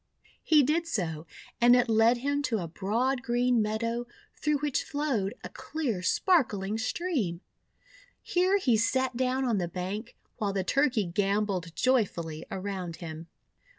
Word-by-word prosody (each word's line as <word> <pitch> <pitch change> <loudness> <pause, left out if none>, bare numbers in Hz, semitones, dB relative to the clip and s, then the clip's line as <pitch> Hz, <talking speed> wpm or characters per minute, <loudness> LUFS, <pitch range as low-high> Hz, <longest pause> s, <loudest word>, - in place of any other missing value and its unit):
He 305 -3 +5
did 325 +5 +1
so, 165 - -3 0.3
and 240 +1 +7
it 245 0 +3
led 225 +2 +4
him 285 +3 -1
to 225 - +1
a 175 -4 -4
broad 230 +10 -1
green 245 -1 +2
meadow, 230 +3 -2 0.3
through 300 -1 0
which 290 -1 -1
flowed 270 -10 -1
a - - -6
clear 260 -12 -3
spark 320 - +3
ling 200 +2 -3
stream. 245 - -2 0.8
Here 370 +3 +2
he 250 - +2
sat 260 +3 +1
down 260 +1 0
on 230 -5 +1
the 175 - -1
bank, 190 +6 -5 0.2
while 205 -4 -1
the 195 -1 0
Turkey 255 0 +2
gambolled 195 -2 -1
joyfully 170 -10 0
around 190 -3 -4
him. 160 -1 -8
230 Hz, 150 wpm, -28 LUFS, 190-265 Hz, 0.8 s, and